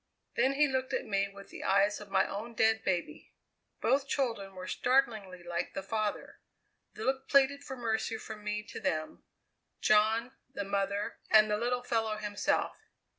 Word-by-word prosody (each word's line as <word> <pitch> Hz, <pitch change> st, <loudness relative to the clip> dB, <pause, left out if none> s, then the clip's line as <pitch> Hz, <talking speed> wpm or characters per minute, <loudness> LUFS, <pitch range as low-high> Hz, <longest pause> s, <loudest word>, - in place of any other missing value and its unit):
Then 270 Hz, -, +3 dB
he 295 Hz, +2 st, +4 dB
looked 260 Hz, -1 st, -1 dB
at -, -, -1 dB
me 200 Hz, -1 st, 0 dB
with 200 Hz, 0 st, -13 dB
the -, -, -8 dB
eyes 200 Hz, +2 st, +3 dB
of 205 Hz, -, -10 dB
my 190 Hz, 0 st, +3 dB
own 225 Hz, +4 st, -6 dB
dead 220 Hz, 0 st, +3 dB
baby. 180 Hz, -2 st, -3 dB, 0.5 s
Both 275 Hz, +1 st, +2 dB
children 230 Hz, -9 st, -1 dB
were 185 Hz, 0 st, -7 dB
startlingly 215 Hz, -7 st, +1 dB
like 175 Hz, 0 st, -3 dB
the 195 Hz, -, -3 dB
father. 215 Hz, 0 st, -3 dB, 0.6 s
The -, -, -5 dB
look 265 Hz, 0 st, -1 dB
pleaded 280 Hz, 0 st, +4 dB
for 265 Hz, -, -6 dB
mercy 225 Hz, -1 st, -1 dB
from 215 Hz, -1 st, -9 dB
me 210 Hz, 0 st, -2 dB
to 210 Hz, -, -8 dB
them 155 Hz, -1 st, -2 dB, 0.6 s
John, 220 Hz, +3 st, +3 dB, 0.2 s
the 235 Hz, -7 st, -3 dB
mother, 200 Hz, +1 st, -1 dB
and 215 Hz, -1 st, +6 dB
the 210 Hz, -, +2 dB
little 245 Hz, +2 st, -1 dB
fellow 225 Hz, -3 st, 0 dB
himself. 210 Hz, -1 st, -1 dB
215 Hz, 170 wpm, -31 LUFS, 200-245 Hz, 0.6 s, and